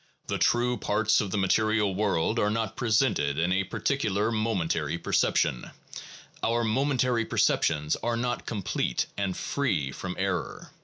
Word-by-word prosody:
The - - -3
true 120 +1 +2
parts 110 +1 +2
of 105 - -3
the 105 - -2
material 105 +1 +2
world 105 +2 0
are 105 - +2
not 110 -1 -2
presented 110 - +1
in 85 +3 +1
a 95 +1 +1
particular 110 -2 -1
momentary 90 -8 -1
perception; 65 - 0 0.7
our 120 +1 +1
momentary 125 0 +1
perceptions 75 -7 +1
are 120 0 -2
not 120 +1 -2
complete 100 - -1
and 100 -2 -2
free 95 - -1
from 90 +7 -6
error. 95 -1 -3
105 Hz, 140 wpm, -27 LUFS, 95-115 Hz, 0.7 s, true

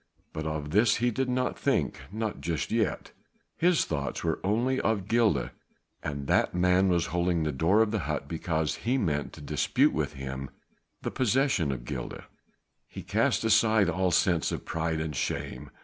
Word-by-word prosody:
But 80 0 -4
of 75 -1 -4
this 105 +4 +4
he 120 +1 +1
did 130 +3 -1
not 125 0 -1
think, - - 0
not 110 0 -3
just 85 -2 -2
yet. 110 -3 -1 0.4
His 175 -1 +3
thoughts 70 -4 -3
were 80 -1 0
only 120 +7 +1
of 100 -4 0
Gilda, 110 - +2 0.5
and 70 -1 -4
that - - +2
man 90 +1 +3
was 85 -2 +2
holding 85 -1 +1
the 75 - 0
door 85 +11 +3
of 105 - -2
the 110 - 0
hut - - -3
because 80 -1 -1
he 125 +9 0
meant 75 - -1
to - - -11
dispute 75 -1 +2
with - - -1
him 65 0 -6 0.5
the - - -2
possession 130 - +1
of 60 -3 -5
Gilda. - - -5 0.6
He - - -9
cast - - +1
aside 110 -3 +4
all 95 +2 +1
sense 85 -1 +2
of - - -5
pride 80 0 -1
and 80 -2 -3
shame. - - -3
90 Hz, 175 wpm, -28 LUFS, 80-110 Hz, 0.6 s, this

